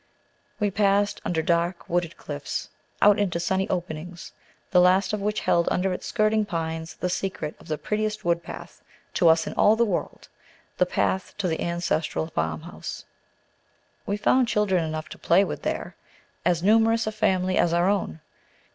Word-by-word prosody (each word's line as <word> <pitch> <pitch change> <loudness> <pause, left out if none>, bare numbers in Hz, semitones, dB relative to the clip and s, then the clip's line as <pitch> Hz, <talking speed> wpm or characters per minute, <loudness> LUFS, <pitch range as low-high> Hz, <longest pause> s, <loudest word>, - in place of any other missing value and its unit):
We 205 -2 +1
passed 200 0 +2
under 160 -2 -1
dark 170 +1 0
wooded 175 -1 -1
cliffs 145 -1 -5 0.3
out 205 0 +6
into 185 -4 0
sunny 190 +2 0
openings, 175 -1 -5 0.4
the 180 - +6
last 185 +2 +4
of 210 - -1
which 210 +1 -1
held 170 0 +2
under 185 +1 0
its - - -6
skirting 215 -1 +2
pines 165 -3 -4
the - - -2
secret 180 -4 -3
of - - -16
the 155 - -2
prettiest 215 +2 -2
woodpath 170 0 -3 0.3
to 175 - +3
us 160 0 +4
in - - -5
all 210 - +5
the 235 +1 +3
world, 195 -6 -3 0.5
the 180 - +4
path 190 +1 -1
to 200 - -1
the 160 -2 -2
ancestral 170 -2 -1
farmhouse. 80 - -5 1.0
We 200 - 0
found 255 +4 +3
children 205 -6 +1
enough 155 -1 -4
to - - -10
play 180 +4 +4
with - - -4
there, - - -3 0.5
as 175 -1 +1
numerous 225 +2 +4
a 220 - -1
family 190 -4 +1
as 170 - +3
our 175 +1 +2
own. 190 - -1
180 Hz, 165 wpm, -25 LUFS, 170-205 Hz, 1.0 s, out